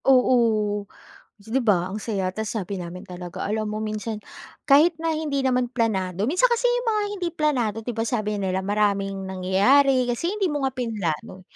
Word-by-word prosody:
Oo. 225 Hz, -6 st, +3 dB, 0.6 s
'Di 225 Hz, +5 st, -1 dB
ba, 185 Hz, -4 st, +2 dB
ang 205 Hz, -, -4 dB
saya. 200 Hz, -3 st, -2 dB
Tapos 220 Hz, +4 st, -4 dB
sabi 200 Hz, -2 st, -3 dB
namin 180 Hz, +1 st, -7 dB
talaga, 180 Hz, -3 st, -7 dB
alam 215 Hz, +1 st, -1 dB
mo 210 Hz, 0 st, -3 dB
minsan, 215 Hz, 0 st, -4 dB, 0.5 s
kahit 305 Hz, +5 st, +6 dB
na 330 Hz, 0 st, 0 dB
hindi 305 Hz, -3 st, -1 dB
naman 250 Hz, -1 st, +2 dB
planado 195 Hz, -6 st, -1 dB
minsan 365 Hz, -, +4 dB
kasi -, -, +2 dB
'yung 485 Hz, 0 st, 0 dB
mga 430 Hz, -2 st, +2 dB, 0.2 s
hindi 355 Hz, -2 st, -1 dB
planado, 260 Hz, -10 st, +1 dB
'di 245 Hz, -, -4 dB
ba, 225 Hz, -, 0 dB
sabi 215 Hz, -4 st, -1 dB
nila 190 Hz, -1 st, -1 dB
maraming 195 Hz, -1 st, 0 dB
nangyayari 245 Hz, +9 st, +3 dB
kasi 245 Hz, +8 st, -1 dB
hindi 400 Hz, -2 st, +1 dB
mo 290 Hz, -1 st, -2 dB
nga 270 Hz, -, +1 dB
pinlano. 195 Hz, -7 st, -3 dB
220 Hz, 175 wpm, -24 LUFS, 195-270 Hz, 0.6 s, kahit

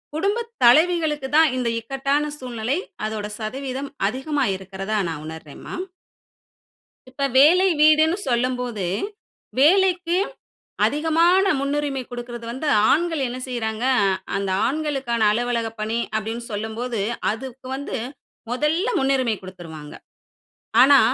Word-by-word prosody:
குடும்பத் 440 Hz, +8 st, -1 dB
தலைவிகளுக்கு 305 Hz, +2 st, +4 dB
தான் 320 Hz, -3 st, +6 dB
இந்த 245 Hz, -2 st, 0 dB
இக்கட்டான 275 Hz, +5 st, -1 dB
சூழ்நிலை 245 Hz, 0 st, -2 dB, 0.3 s
அதோட 215 Hz, -1 st, -4 dB
சதவீதம் 265 Hz, +4 st, -4 dB, 0.2 s
அதிகமா 270 Hz, +3 st, -1 dB
இருக்கிறதா 195 Hz, +3 st, -3 dB
நான் 155 Hz, -2 st, -5 dB
உணர்றேன்ம்மா. 160 Hz, -2 st, -9 dB, 1.3 s
இப்ப 275 Hz, +2 st, -2 dB
வேலை 345 Hz, +8 st, +6 dB
வீடுன்னு 310 Hz, +3 st, +5 dB
சொல்லும்போது, 245 Hz, -4 st, -1 dB, 0.7 s
வேலைக்கு 360 Hz, +2 st, +4 dB, 0.7 s
அதிகமான 330 Hz, +5 st, +3 dB
முன்னுரிமை 280 Hz, -1 st, -1 dB
குடுக்கிறது 240 Hz, -1 st, -7 dB
வந்து, 265 Hz, +6 st, -4 dB, 0.2 s
ஆண்கள் 325 Hz, 0 st, +2 dB
என்ன 245 Hz, +1 st, -5 dB
செய்றாங்க, 230 Hz, -2 st, -3 dB, 0.5 s
அந்த 195 Hz, -1 st, -1 dB, 0.2 s
ஆண்களுக்கான 270 Hz, -5 st, -1 dB
அலுவலக 235 Hz, 0 st, 0 dB
பணி 220 Hz, +2 st, -1 dB, 0.2 s
அப்படின்னு 225 Hz, +2 st, -3 dB
சொல்லும்போது, 220 Hz, +2 st, -3 dB, 0.3 s
அதுக்கு 260 Hz, +3 st, -8 dB
வந்து 280 Hz, +2 st, -4 dB, 0.5 s
மொதல்ல 300 Hz, -, +1 dB
முன்னுரிமை 265 Hz, -4 st, +1 dB
குடுத்துருவாங்க. 165 Hz, -5 st, -10 dB, 0.9 s
ஆனா -, -, +8 dB
255 Hz, 100 wpm, -22 LUFS, 225-300 Hz, 1.3 s, ஆனா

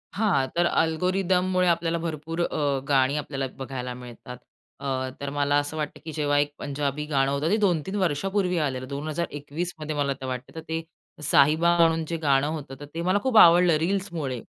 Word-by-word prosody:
हां. 200 Hz, -11 st, +2 dB
तर 175 Hz, 0 st, +3 dB
अल्गोरिदममुळे 185 Hz, +2 st, +1 dB
आपल्याला 170 Hz, -1 st, +1 dB
भरपूर 165 Hz, 0 st, -4 dB
अ, 145 Hz, -5 st, 0 dB
गाणी 135 Hz, 0 st, +3 dB
आपल्याला 140 Hz, -2 st, -3 dB
बघायला 130 Hz, -2 st, -5 dB
मिळतात. 125 Hz, 0 st, -10 dB, 0.4 s
अ, 130 Hz, -1 st, -2 dB
तर 140 Hz, -, -3 dB
मला 145 Hz, 0 st, +2 dB
असं 145 Hz, +2 st, -4 dB
वाटतं 150 Hz, -1 st, -4 dB
की 160 Hz, -, -5 dB
जेव्हा 145 Hz, -2 st, +1 dB
एक 145 Hz, 0 st, +1 dB
पंजाबी 145 Hz, +1 st, -3 dB
गाणं 135 Hz, -2 st, +1 dB
होतं 140 Hz, +3 st, 0 dB
ते, 215 Hz, -, +3 dB
2-3 190 Hz, -3 st, 0 dB
वर्षापूर्वी 185 Hz, +1 st, 0 dB
आलेलं 130 Hz, -5 st, -2 dB
2021मध्ये 155 Hz, +2 st, -4 dB
मला 140 Hz, -1 st, 0 dB
तर -, -, -5 dB
वाटतं, 125 Hz, -1 st, -5 dB
तर -, -, -5 dB
ते 165 Hz, 0 st, -2 dB, 0.4 s
साहिबा 155 Hz, +4 st, +4 dB
म्हणून 165 Hz, -1 st, +3 dB
जे 170 Hz, -, -2 dB
गाणं 140 Hz, -1 st, +3 dB
होतं 150 Hz, -4 st, -5 dB
तर 145 Hz, -, -8 dB
ते 165 Hz, -, -3 dB
मला 185 Hz, +4 st, +2 dB
खूप 260 Hz, -4 st, +2 dB
आवडलं 175 Hz, -3 st, +7 dB
रील्समुळे, 165 Hz, -7 st, -2 dB
155 Hz, 175 wpm, -25 LUFS, 140-170 Hz, 0.4 s, आवडलं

